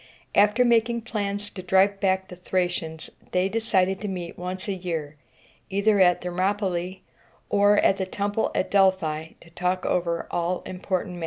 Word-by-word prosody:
After 210 +5 +4
making 235 0 +2
plans 205 -2 -3
to 185 - -7
drive 190 +2 +3
back 190 -1 +1
the 180 - -8
Thracians, 175 -3 -2 0.2
they 180 +1 +2
decided 195 -3 +1
to 210 - -3
meet 180 -3 -5
once 185 +2 -6
a 200 - 0
year, 165 -5 -4 0.5
either 200 +1 +2
at 180 -2 +4
Thermopylæ 185 0 -1 0.5
or 205 0 +5
at 195 - +4
the 190 - -2
temple 205 +3 -1
at - - -1
Delphi, 175 -5 +2
to 165 - -17
talk 180 +2 -1
over 170 -1 0
all 175 +1 -1
important 185 -1 -3
matters. 175 - -8
190 Hz, 160 wpm, -25 LUFS, 180-205 Hz, 0.5 s, or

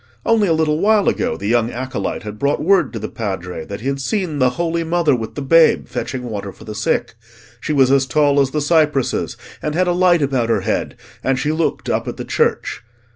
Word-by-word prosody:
Only 225 -3 +3
a 165 - +3
little 155 -1 +1
while 210 +1 +3
ago, 240 +1 0
the - - -7
young 115 +1 +2
acolyte 130 +2 -4
had 105 0 -7
brought 140 +3 0
word 195 +3 +3
to - - -4
the 110 0 -4
Padre 95 -6 -5
that 100 +4 -7
he 130 - -4
had 140 0 -1
seen 175 -2 -2
the 130 -1 +4
Holy 170 0 0
Mother 165 -3 +2
with 115 -2 -6
the 145 - -4
Babe, 165 +4 +4
fetching 130 -2 -4
water 105 -4 -5
for - - -15
the 110 - -7
sick: 105 +2 -1 0.5
she - - -4
was 135 -3 +4
as 135 -1 +3
tall 145 +1 +3
as 135 -1 +3
the 150 +2 -2
cypresses, 150 -4 +1 0.2
and 150 0 -3
had 185 +2 +2
a 180 - +1
light 175 -3 +3
about 130 -4 0
her 115 - +2
head, - - -2 0.3
and 135 0 +1
she 145 +4 0
looked 160 +1 -1
up - - -1
at - - -5
the - - -5
church. - - 0
140 Hz, 230 wpm, -19 LUFS, 120-165 Hz, 0.5 s, the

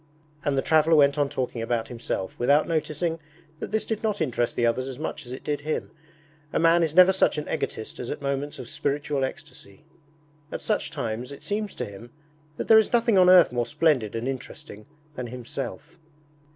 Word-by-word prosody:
And 140 -1 0
the 135 - +1
traveller 160 +1 +4
went 140 -1 +4
on 145 -1 +2
talking 125 -3 -3
about 115 0 -1
himself, 115 -5 -4
without 145 +5 +3
noticing 165 +1 -1 0.4
that - - -5
this 220 +1 -1
did 220 -2 -3
not 215 -3 -1
interest 120 -6 -1
the 120 - +1
others 130 +3 0
as 130 -2 -6
much 150 -2 -5
as - - -8
it 130 - -7
did 145 -1 -2
him. 155 +1 -3 0.6
A - - 0
man 165 +1 +4
is 160 -2 0
never 185 +1 +8
such 190 - +2
an 150 - -4
egotist 110 - -4
as 120 - -5
at - - -4
moments 140 +1 -3
of - - -8
spiritual 145 -2 -1
ecstasy. 150 - -8 0.7
At - - -5
such - - 0
times 115 +4 -4
it 140 - -10
seems 205 0 -3
to - - -3
him 100 +4 -11 0.5
that - - -4
there 220 -1 +8
is 220 - 0
nothing 235 -2 +3
on 180 0 +6
earth 180 -6 +7
more 120 -1 -1
splendid 130 -7 +1
and 115 +2 -3
interesting 120 -4 -7 0.3
than 125 -3 -5
himself. 125 +6 -7
145 Hz, 200 wpm, -25 LUFS, 120-165 Hz, 0.7 s, never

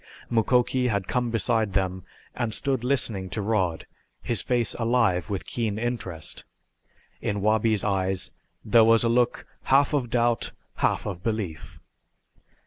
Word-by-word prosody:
Mukoki 125 +2 +2
had 100 -5 -1
come 125 -1 0
beside 110 -1 0
them 95 -1 -1 0.3
and 115 -4 -1
stood 135 -4 -1
listening 110 -7 -1
to 105 - -3
Rod, 95 -7 0 0.4
his 115 -6 +1
face 120 -3 +1
alive 115 -6 +2
with 100 -2 -3
keen 110 -4 -2
interest. 110 -9 -4 0.8
In 100 0 -1
Wabi's 110 0 +2
eyes 95 -2 0 0.3
there 115 +2 +6
was 115 +1 +5
a 115 - +2
look 120 +1 +1 0.2
half 140 +2 +4
of 130 -5 0
doubt, 120 -1 +1 0.2
half - - +1
of 90 -4 -5
belief. 105 -8 -4
110 Hz, 135 wpm, -26 LUFS, 95-120 Hz, 0.8 s, there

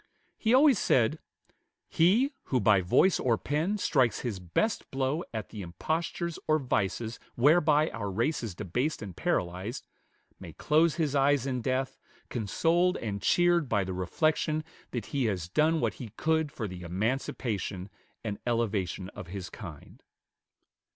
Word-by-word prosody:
He 225 - +1
always 265 -3 +6
said, 130 +6 +2 0.7
"He, 225 - +3
who 130 - +1
by 100 -3 +4
voice 130 - +3
or 120 -3 +2
pen 160 - -1
strikes 130 - +2
his 115 -6 -3
best 90 - -1
blow 135 +5 -1
at 110 -2 -5
the 105 - -7
impostures 160 - -3
or 155 - +4
vices 115 -3 -1 0.2
whereby 150 +3 +4
our 100 -3 -4
race 115 +11 0
is 110 -7 -5
debased 125 - -2
and 95 -4 -8
paralyzed, 90 +8 -2 0.5
may - - -9
close 160 +1 +2
his 155 -5 0
eyes 140 -2 +3
in 130 -2 -2
death, 130 +2 -1 0.3
consoled 165 - +1
and 100 -3 -4
cheered 175 - +3
by 105 -3 +2
the 95 0 -4
reflection 155 - 0 0.3
that 120 -5 -4
he 135 -3 +1
has 95 -6 -1
done 155 - +2
what - - 0
he 120 -5 -8
could 160 -2 +1
for 115 -7 -4
the 90 -2 -8
emancipation 100 0 -2 0.4
and 105 -3 -4
elevation 100 -6 -1
of 90 - -9
his 95 0 -7
kind." 85 -7 -10
125 Hz, 150 wpm, -29 LUFS, 100-155 Hz, 0.7 s, always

